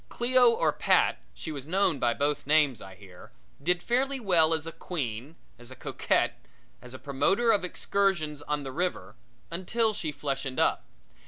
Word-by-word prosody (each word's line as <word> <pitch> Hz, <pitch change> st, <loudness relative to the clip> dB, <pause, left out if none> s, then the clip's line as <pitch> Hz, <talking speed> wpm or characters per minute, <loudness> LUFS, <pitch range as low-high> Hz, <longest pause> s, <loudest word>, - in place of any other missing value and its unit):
Cleo 250 Hz, 0 st, +4 dB
or 230 Hz, -, +1 dB
Pat -, -, +2 dB, 0.2 s
she 160 Hz, -, -6 dB
was 140 Hz, -2 st, -7 dB
known 185 Hz, -4 st, +1 dB
by 120 Hz, -1 st, +1 dB
both 145 Hz, -1 st, -1 dB
names, 145 Hz, -6 st, +3 dB
I 95 Hz, -1 st, -11 dB
hear 95 Hz, -2 st, -15 dB, 0.3 s
did 180 Hz, +4 st, 0 dB
fairly 265 Hz, +3 st, 0 dB
well 175 Hz, -8 st, +3 dB
as 160 Hz, -1 st, 0 dB
a 165 Hz, -, -5 dB
queen, 140 Hz, -4 st, -5 dB, 0.2 s
as 120 Hz, 0 st, -11 dB
a 130 Hz, -, -9 dB
coquette -, -, 0 dB
and -, -, -31 dB, 0.3 s
as 125 Hz, +1 st, -9 dB
a -, -, -6 dB
promoter 195 Hz, -, +1 dB
of 205 Hz, -3 st, +2 dB
excursions 180 Hz, -5 st, -1 dB
on 150 Hz, 0 st, -3 dB
the 135 Hz, -, -6 dB
river 140 Hz, -, -3 dB, 0.4 s
until 215 Hz, +6 st, 0 dB
she 165 Hz, -7 st, -3 dB
fleshened 135 Hz, -2 st, -4 dB
up. -, -, +1 dB
155 Hz, 175 wpm, -28 LUFS, 135-195 Hz, 0.4 s, Cleo